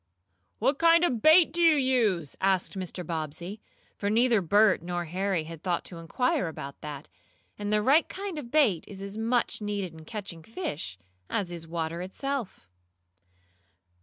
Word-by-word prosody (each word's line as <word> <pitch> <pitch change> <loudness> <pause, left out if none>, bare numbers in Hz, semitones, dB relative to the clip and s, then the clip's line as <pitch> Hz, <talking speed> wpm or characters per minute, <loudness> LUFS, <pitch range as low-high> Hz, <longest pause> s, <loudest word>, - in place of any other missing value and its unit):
"What 270 +5 +1
kind 335 +1 +6
of 250 -10 +1
bait 315 +1 +6
do 345 - 0
you 330 -2 +6
use?" 230 - +1
asked 190 -1 +1
Mr. 185 -1 -5
Bobbsey, 165 +5 -5 0.3
for 200 - -2
neither 230 0 +3
Bert 205 +3 +4
nor 175 0 -3
Harry 185 0 -1
had 160 0 -9
thought 175 -2 -1
to 170 - -8
inquire 185 +3 0
about 140 -3 -7
that, 150 -1 -7 0.5
and 205 0 -2
the 210 0 +2
right 285 +8 +4
kind 385 -4 -5
of 245 -5 -8
bait 235 - +3
is 195 - -9
as 200 +1 -7
much 230 +1 0
needed 205 -4 -3
in 160 -1 -12
catching 200 -6 -6
fish, 160 - -5 0.3
as 185 -4 -1
is 165 -1 -7
water 165 0 -3
itself. 230 - -4
200 Hz, 165 wpm, -28 LUFS, 170-250 Hz, 0.5 s, kind